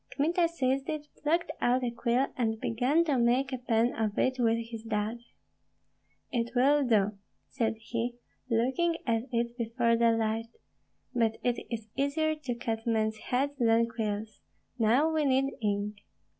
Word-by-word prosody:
Kmita 335 +4 +2
seized 270 -4 -1
it, 300 -1 -4
plucked 330 +3 +1
out 250 +1 +2
a 240 - 0
quill, 240 +2 +1
and 220 -3 0
began 255 +10 +2
to 285 -6 +1
make 250 +3 +2
a 260 - -2
pen 235 -1 +1
of 215 -2 -2
it 260 0 +1
with 230 -1 +3
his 225 -2 -5
dagger. 220 +1 -2 1.1
"It 235 0 -2
will 280 +4 +4
do!" 210 -4 +2 0.3
said 225 -3 0
he, 235 +2 -3 0.3
looking 265 +9 +1
at 230 -1 0
it 235 0 -1
before 230 0 +1
the 230 0 +4
light; 225 0 -1 0.6
"but 225 -3 +1
it 245 -1 0
is 225 -2 -5
easier 310 +3 +1
to 290 -6 -4
cut 225 -1 -3
men's 220 -1 +1
heads 265 +6 -1
than 230 -1 +4
quills. 215 -1 -4 0.4
Now 235 +7 +4
we 310 -1 +2
need 270 0 +2
ink." 205 0 -1
235 Hz, 155 wpm, -29 LUFS, 225-265 Hz, 1.1 s, will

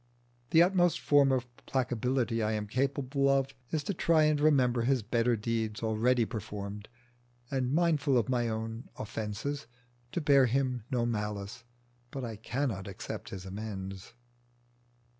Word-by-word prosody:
The 165 +1 +7
utmost 175 -1 +3
form 145 -2 +4
of 130 -2 +1 0.2
placability 125 -2 0
I 110 +1 +1
am 105 -1 -2
capable 140 +4 0
of 135 -1 +2 0.2
is 155 -2 -1
to 200 - -2
try 165 -2 +3
and 150 -1 +2
remember 130 -6 +4
his 125 0 +1
better 120 +2 +2
deeds 110 0 -2
already 115 +2 +2
performed, 105 -1 -6 0.6
and, 130 -2 0
mindful 155 -4 +3
of 115 - +1
my 120 -2 +1
own 115 +2 -4
offences, 110 +7 -4 0.4
to - - -1
bear 140 -4 +5
him 125 -2 0
no 125 -3 +1
malice. 105 -1 -3 0.4
But 135 -1 -5
I 115 -2 -5
cannot 110 -2 -3
accept 100 - -6
his 95 -1 -7
amends. 95 0 -6
120 Hz, 140 wpm, -30 LUFS, 110-140 Hz, 0.6 s, The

